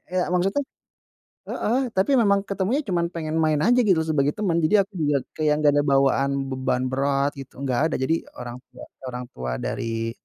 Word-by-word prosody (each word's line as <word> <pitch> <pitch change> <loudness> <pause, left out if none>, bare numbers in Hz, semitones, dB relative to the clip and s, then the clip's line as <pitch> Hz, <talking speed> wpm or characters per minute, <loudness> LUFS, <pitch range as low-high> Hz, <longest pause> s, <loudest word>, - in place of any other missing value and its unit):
ya 180 - +1
maksudnya 190 +9 +1 0.9
heeh, 240 +4 0 0.2
tapi 195 +9 +2
memang 200 -3 +3
ketemunya 200 +9 0
cuman 175 -4 0
pengen 160 -1 -3
main 155 -1 +2
aja, 245 +2 +4
gitu, 190 -8 +3
sebagai 145 -2 +1
teman, 190 -6 0
jadi 200 +6 +4
aku 205 - -54
juga 150 -2 +2 0.2
kayak 155 -1 +1
nggak 145 - +5
ada 145 - +2
bawaan 135 0 +3 0.2
beban 130 -1 -1
berat 140 +1 +1
gitu, 135 -1 -10
nggak 130 -2 0
ada, - - +1
jadi 160 +5 0 0.2
orang 120 0 -7
tua 125 - -12 0.3
orang 125 0 -5
tua 65 0 -4
dari 115 0 -3
155 Hz, 180 wpm, -24 LUFS, 135-190 Hz, 0.9 s, nggak